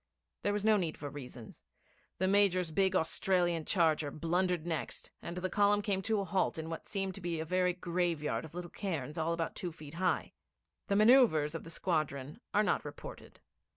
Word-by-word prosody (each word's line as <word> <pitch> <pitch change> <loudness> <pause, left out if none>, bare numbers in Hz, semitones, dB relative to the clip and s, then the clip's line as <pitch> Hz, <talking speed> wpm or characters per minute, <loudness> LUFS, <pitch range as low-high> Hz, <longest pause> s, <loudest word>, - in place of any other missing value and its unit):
There 205 - +1
was 205 0 -1
no 215 -1 +6
need 170 -5 -2
for 145 -2 -6
reasons. 125 -5 -10 0.5
The 185 - +1
Major's 190 -4 +3
big 190 +3 +2
Australian 175 -1 +1
charger 160 -5 +2
blundered 175 +3 0
next, 165 -2 -3
and 170 +1 -6
the 185 +1 -1
column 205 +2 +3
came 195 -2 0
to 220 +1 0
a - - -3
halt 190 -2 0
in 160 +1 -5
what 165 - -6
seemed 195 -2 -2
to 195 - -9
be 170 -2 -2
a 160 - -2
very 180 +1 +2
graveyard 175 -4 -1
of 160 +1 -11
little 175 -1 -6
cairns 160 -5 -3
all 160 +1 0
about 170 -1 -2
two 180 - -4
feet 155 -2 -11
high. 185 +2 0 0.5
The 200 - +1
man[oe]uvres 215 - +5
of 165 - -6
the - - -8
squadron 155 - -2
are 210 - +3
not - - +1
reported. - - -10
175 Hz, 190 wpm, -33 LUFS, 160-195 Hz, 0.5 s, no